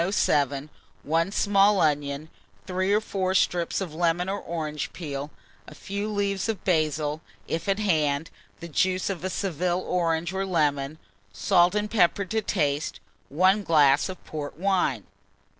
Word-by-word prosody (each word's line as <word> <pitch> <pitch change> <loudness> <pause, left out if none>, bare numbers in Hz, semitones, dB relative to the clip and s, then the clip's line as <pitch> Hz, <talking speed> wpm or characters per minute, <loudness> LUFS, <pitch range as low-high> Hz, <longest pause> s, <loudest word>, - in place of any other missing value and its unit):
107, 145 -6 +1 0.3
1 165 +5 +1
small 200 0 +4
onion, 145 -1 0 0.4
3 185 +2 -1
or 210 - +4
4 190 -3 -2
strips 175 -1 +1
of 175 -5 -4
lemon 170 +2 +1
or 200 +1 -2
orange 155 -3 -4
peel, 145 -4 -5 0.4
a - - -11
few 200 +2 -4
leaves 200 -1 -1
of 215 -4 -3
basil, 155 -3 0 0.3
if 165 +4 -3
at 195 - +2
hand, 160 -7 0 0.3
the 170 - -6
juice 185 +4 +1
of 180 -2 -6
a 190 - -1
Seville 180 -1 -1
orange 170 -1 -1
or 190 0 -1
lemon, 150 -5 0 0.3
salt 175 - +3
and 210 0 -1
pepper 200 -1 +3
to 220 +3 -1
taste, 150 -8 -1 0.3
1 185 +8 +3
glass 150 -4 +4
of 185 - -6
port 150 -2 -6
wine. 180 - +1
175 Hz, 150 wpm, -26 LUFS, 150-195 Hz, 0.4 s, small